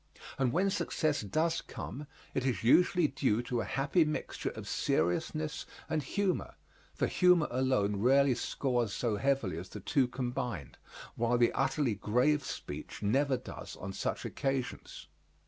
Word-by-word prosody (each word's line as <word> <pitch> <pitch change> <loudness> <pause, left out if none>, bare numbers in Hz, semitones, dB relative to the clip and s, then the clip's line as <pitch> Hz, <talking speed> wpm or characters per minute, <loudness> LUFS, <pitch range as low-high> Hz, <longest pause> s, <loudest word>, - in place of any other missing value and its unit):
And 130 -2 +2
when 195 +6 +2
success 155 -5 0
does 160 - 0
come 145 +2 -7 0.3
it 135 - 0
is 130 -4 -1
usually 175 +6 +5
due 130 -5 0
to 120 -1 -1
a - - -3
happy 145 +5 +2
mixture 150 0 -3
of - - -8
seriousness 150 - -1 0.2
and 155 - 0
humor, 190 +6 -1 0.4
for - - +1
humor 180 -4 +4
alone 125 -6 +1
rarely 135 +5 +4
scores 120 -3 -1
so 110 0 0
heavily 115 - 0
as 90 - -9
the - - -7
two 135 -4 +2
combined, 125 - -4 0.4
while 120 +1 +2
the 120 -1 +3
utterly 140 -7 +1
grave 125 +9 +2
speech - - -7
never 135 +6 +2
does 125 - -8
on 95 0 -6
such - - -3
occasions. 135 -2 -3
130 Hz, 145 wpm, -32 LUFS, 115-150 Hz, 0.4 s, usually